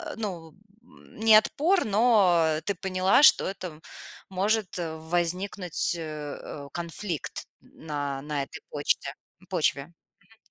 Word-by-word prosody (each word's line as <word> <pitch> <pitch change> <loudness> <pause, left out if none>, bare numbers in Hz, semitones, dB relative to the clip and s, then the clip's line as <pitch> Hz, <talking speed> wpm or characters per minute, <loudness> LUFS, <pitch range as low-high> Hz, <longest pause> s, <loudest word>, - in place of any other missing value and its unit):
ну, 180 -7 -6 0.3
не 220 -2 +1
отпор, 325 - +3
но 195 -8 +3
ты 200 - 0
поняла, 185 +5 +2
что 295 - +7
это 190 -1 -5
м 155 -1 -12 0.5
может 200 +1 0
возникнуть, 175 +3 -1
э, 170 - -6 0.4
э, 145 -1 -8
конфликт 170 0 -5 0.2
на 145 -3 -5
на 150 -1 -2
этой - - -10
почте 145 -1 -1 0.4
почве. 160 -3 0 0.3
Мгм. 225 +3 -25
180 Hz, 115 wpm, -27 LUFS, 160-205 Hz, 0.5 s, что